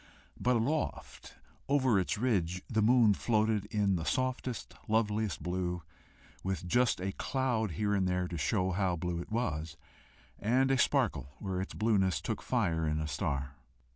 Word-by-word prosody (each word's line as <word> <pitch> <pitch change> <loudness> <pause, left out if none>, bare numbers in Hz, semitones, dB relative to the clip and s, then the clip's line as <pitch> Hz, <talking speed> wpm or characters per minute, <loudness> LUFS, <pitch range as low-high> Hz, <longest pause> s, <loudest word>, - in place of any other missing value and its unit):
But 125 +1 +2
aloft 140 +7 -2 0.3
over 130 -7 +3
its 95 +4 -1
ridge 95 -7 0
the 110 -2 +1
moon 115 -1 +5
floated 110 -1 +1
in 100 -3 +1
the 80 - -3
softest, 130 +1 -2
loveliest 110 -2 0
blue, 90 -1 -2 0.6
with 95 -3 -2
just 120 +4 +2
a 95 +1 -2
cloud 120 - -1
here 105 +5 0
and 95 -2 +2
there 90 0 0
to 90 - -6
show 90 +5 +1
how 95 -1 +1
blue 85 0 -3
it 95 - -10
was, 80 -9 -2 0.6
and 130 +5 +2
a 135 - +3
sparkle 105 - +1
where 95 -2 -3
its 95 - -6
blueness 100 -4 +2
took - - -3
fire 80 -2 0
in 75 0 0
a 75 - -2
star. 70 -3 -2
100 Hz, 160 wpm, -32 LUFS, 90-115 Hz, 0.6 s, moon